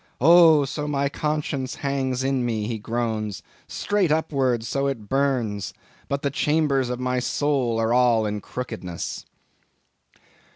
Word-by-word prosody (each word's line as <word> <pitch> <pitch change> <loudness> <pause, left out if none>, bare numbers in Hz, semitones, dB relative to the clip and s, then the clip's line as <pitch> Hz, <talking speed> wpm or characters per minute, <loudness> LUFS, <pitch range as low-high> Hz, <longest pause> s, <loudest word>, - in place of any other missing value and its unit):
'Oh! 160 0 +7
so 150 +2 -4
my 140 -1 0
conscience 150 -3 -2
hangs 130 -2 -1
in 135 -1 0
me!' 110 -3 -1
he 110 0 -3
groans, 110 -2 -3 0.2
'straight 205 -6 0
upwards, 135 -7 0
so 140 0 0
it 115 -7 -4
burns; 130 -7 0 0.3
but 140 +2 -2
the 140 - 0
chambers 145 -3 +1
of 125 0 -3
my 125 0 0
soul 130 -3 0
are 115 +1 +1
all 120 -3 +4
in 105 0 -3
crookedness! 110 -10 -6
130 Hz, 135 wpm, -24 LUFS, 115-140 Hz, 0.3 s, Oh